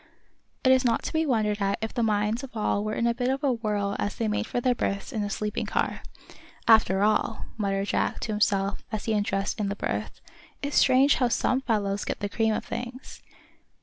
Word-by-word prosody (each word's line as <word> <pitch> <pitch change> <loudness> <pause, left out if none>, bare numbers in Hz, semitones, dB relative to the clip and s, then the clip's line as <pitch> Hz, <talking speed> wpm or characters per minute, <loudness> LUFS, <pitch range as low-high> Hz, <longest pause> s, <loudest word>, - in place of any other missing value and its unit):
It 260 - +5
is 260 0 +5
not 235 -2 +1
to - - -4
be 320 0 +1
wondered 210 -5 +1
at 195 0 +1
if 220 0 -4
the 240 - -1
minds 215 +2 +1
of 255 -4 -8
all 210 -1 0
were 215 0 -2
in 235 - 0
a 235 - +3
bit 245 +1 -2
of 270 +2 -1
a 275 -3 +3
whirl 210 -3 -1
as 205 - -2
they 225 - -1
made 215 +1 -1
for - - -1
their 250 +1 +2
berths 200 +1 -3
in 220 - -1
a 205 - -2
sleeping 210 +1 -3
car. - - -1 0.7
"After 210 -3 +5
all," 215 0 +1
muttered 200 -2 -1
Jack, - - 0
to 225 - -2
himself, 200 -1 +1
as 215 -2 -3
he 225 - 0
undressed 205 0 -1
in 205 - 0
his 200 - -4
berth, - - -3 0.4
"it's 285 +1 -1
strange 270 +2 +5
how 250 - +3
some 255 +2 +1
fellows 205 -5 0
get - - -3
the 205 - -3
cream 220 +1 +1
of - - -4
things. 245 +2 -7
220 Hz, 220 wpm, -26 LUFS, 205-245 Hz, 0.7 s, It